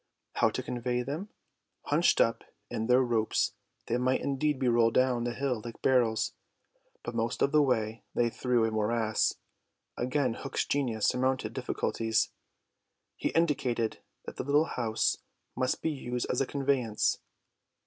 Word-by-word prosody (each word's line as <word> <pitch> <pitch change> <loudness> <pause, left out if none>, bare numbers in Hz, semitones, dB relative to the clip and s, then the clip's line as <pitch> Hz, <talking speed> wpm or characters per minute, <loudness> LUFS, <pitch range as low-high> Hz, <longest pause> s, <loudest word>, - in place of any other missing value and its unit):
How - - +3
to - - -4
convey 125 0 -2
them? 155 - -5 0.5
Hunched - - +3
up - - +2 0.3
in 110 - -2
their 125 +1 +5
ropes 115 -3 +1 0.3
they 120 - 0
might 130 +1 +1
indeed 140 +1 0
be 130 -1 0
rolled 115 -1 +3
down 130 -2 +3
hill 125 -1 -1
like 120 -1 -9
barrels, 120 -4 +2 0.7
but 120 - -5
most 115 0 0
of 140 - +2
the 150 - +5
way 115 -5 0
lay 120 -1 +2
through 125 -2 +1
a 115 - -1
morass. 110 0 +1 0.6
Again 125 0 0
Hook's 135 +3 -3
genius 120 -7 0
surmounted 130 -3 0
difficulties. 115 -3 0 0.8
He - - -1
indicated 130 -8 0 0.3
that - - -8
the - - -2
little 145 +3 +3
house 110 -1 +1 0.4
must 130 0 -1
be 160 - +1
used 125 -4 -3
as - - 0
a 135 - +1
conveyance. 135 -6 +1
125 Hz, 150 wpm, -30 LUFS, 115-135 Hz, 0.8 s, their